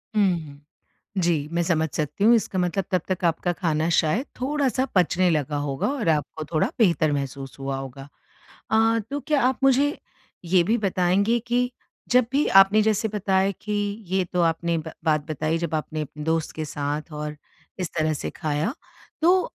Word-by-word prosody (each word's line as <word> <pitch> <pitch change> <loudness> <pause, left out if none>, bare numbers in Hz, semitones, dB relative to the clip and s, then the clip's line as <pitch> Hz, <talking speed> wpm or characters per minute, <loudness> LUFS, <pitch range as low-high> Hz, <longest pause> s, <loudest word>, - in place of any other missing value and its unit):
हुँ, 210 - +4 0.2
हुँ। 140 -1 -13 0.6
जी, 170 -5 +1
मैं 170 0 0
समझ 160 -2 +1
सकती 155 +6 -2
हूँ 235 +2 +7
इसका 200 -4 -1
मतलब 180 +2 0
तब 185 -3 +2
तक 185 -1 -2
आपका 170 +2 +1
खाना 165 -2 0
शायद 205 - +1
थोड़ा-सा 270 -1 0
पचने 180 0 +3
लगा 150 -3 0
होगा 140 -2 -1
और 265 -10 -1
आपको 155 0 -1
थोड़ा 155 - +3
बेहतर 170 -8 +3
महसूस 135 -1 -4
हुआ 135 0 -3
होगा। 135 +1 -8 0.6
अ, 225 +1 +4
तो 285 +1 -2
क्या 295 -1 +1
आप 255 +1 +1
मुझे 275 +3 +3 0.5
ये 175 0 +4
भी 225 +6 +1
बताएँगे 200 +3 +2
कि 245 +1 +1 0.4
जब 250 -1 +5
भी 285 +2 +2
आपने 195 +3 +7
जैसे 220 0 +1
बताया 195 -1 +1
कि 210 - -5 0.4
ये 190 0 +1
तो 180 - +2
आपने 165 0 +1
ब 160 0 -5
बात 155 -2 +2
बताई 155 +2 -1
जब 165 -2 -2
आपने 155 0 -3
अपने 150 +1 -7
दोस्त 160 0 0
के 155 -1 -3
साथ 145 +2 -4
और 150 0 -5 0.4
इस 180 -4 -2
तरह 155 0 +2
से - - -4
खाया 155 - -1 0.5
तो, 360 +3 +5
175 Hz, 180 wpm, -24 LUFS, 155-215 Hz, 0.6 s, हूँ